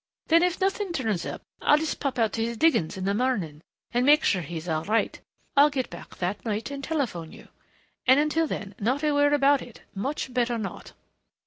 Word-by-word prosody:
Then 330 Hz, +1 st, +6 dB
if 360 Hz, 0 st, +1 dB
nothing 390 Hz, -1 st, 0 dB
turns 220 Hz, -, -1 dB
up -, -, -6 dB, 0.2 s
I'll 295 Hz, -, +5 dB
just 315 Hz, 0 st, -2 dB
pop 275 Hz, -3 st, -2 dB
out 225 Hz, -2 st, +1 dB
to 225 Hz, -, -1 dB
his 235 Hz, 0 st, -3 dB
diggings 255 Hz, -, +2 dB
in 185 Hz, -, -4 dB
the 200 Hz, -, +1 dB
morning 200 Hz, -, -1 dB, 0.3 s
and 245 Hz, +1 st, +2 dB
make 295 Hz, +3 st, +5 dB
sure 185 Hz, -, +2 dB
he's 165 Hz, +1 st, -6 dB
all 160 Hz, -1 st, -1 dB
right.... 220 Hz, +4 st, 0 dB, 0.4 s
I'll 290 Hz, +1 st, +7 dB
get 265 Hz, -4 st, -3 dB
back -, -, -10 dB
that 185 Hz, +3 st, -3 dB
night 220 Hz, +3 st, -3 dB
and 280 Hz, 0 st, -6 dB
telephone 245 Hz, -, -2 dB
you. -, -, -14 dB, 0.6 s
And 260 Hz, +2 st, +7 dB
until 310 Hz, +2 st, +1 dB
then, 200 Hz, -7 st, -5 dB
not 255 Hz, +8 st, 0 dB
a 300 Hz, -, +3 dB
word 290 Hz, 0 st, +4 dB
about 285 Hz, -1 st, +4 dB
it. 240 Hz, -, -12 dB
Much 260 Hz, +5 st, -3 dB
better 240 Hz, -1 st, +1 dB
not." 210 Hz, -3 st, -6 dB
250 Hz, 210 wpm, -26 LUFS, 200-290 Hz, 0.6 s, I'll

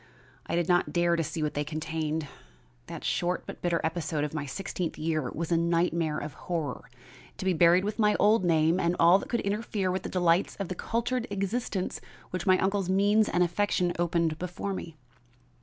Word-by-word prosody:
I -, -, -1 dB
did 175 Hz, -1 st, +1 dB
not 175 Hz, -1 st, +2 dB
dare 175 Hz, 0 st, +3 dB
to 165 Hz, -, 0 dB
see 160 Hz, +1 st, -3 dB
what 150 Hz, -, -1 dB
they 145 Hz, -, -1 dB
contained. 155 Hz, 0 st, -3 dB, 0.6 s
That -, -, -7 dB
short 175 Hz, +1 st, 0 dB
but -, -, -9 dB
bitter 170 Hz, -1 st, +1 dB
episode 160 Hz, -2 st, -1 dB
of 150 Hz, -, -3 dB
my 150 Hz, -2 st, -3 dB
sixteenth 180 Hz, +2 st, -4 dB
year 155 Hz, -4 st, -1 dB
was 170 Hz, +2 st, -4 dB
a 170 Hz, -, +4 dB
nightmare 170 Hz, -2 st, +1 dB
of 150 Hz, 0 st, -5 dB
horror, 160 Hz, -8 st, -4 dB, 0.5 s
to -, -, -5 dB
be 190 Hz, -, +3 dB
buried 175 Hz, +2 st, +5 dB
with 210 Hz, +2 st, -3 dB
my 210 Hz, -1 st, +4 dB
old 210 Hz, 0 st, +4 dB
name 165 Hz, 0 st, +3 dB
and 170 Hz, -1 st, +1 dB
all 175 Hz, +3 st, +6 dB
that -, -, -9 dB
could 235 Hz, -, 0 dB
interfere 200 Hz, -2 st, -1 dB
with 185 Hz, -, -2 dB
the -, -, -6 dB
delights 175 Hz, 0 st, +2 dB
of 195 Hz, -3 st, -5 dB
the -, -, -2 dB
cultured 235 Hz, +5 st, -2 dB
existence 200 Hz, 0 st, -2 dB, 0.3 s
which 180 Hz, 0 st, -4 dB
my 185 Hz, 0 st, +6 dB
uncle's 195 Hz, -1 st, 0 dB
means 205 Hz, +3 st, +3 dB
and 180 Hz, -, +2 dB
affection 180 Hz, 0 st, +1 dB
opened 170 Hz, -2 st, +1 dB
before 180 Hz, +2 st, -4 dB
me. 165 Hz, -4 st, -7 dB
175 Hz, 195 wpm, -28 LUFS, 160-195 Hz, 0.6 s, all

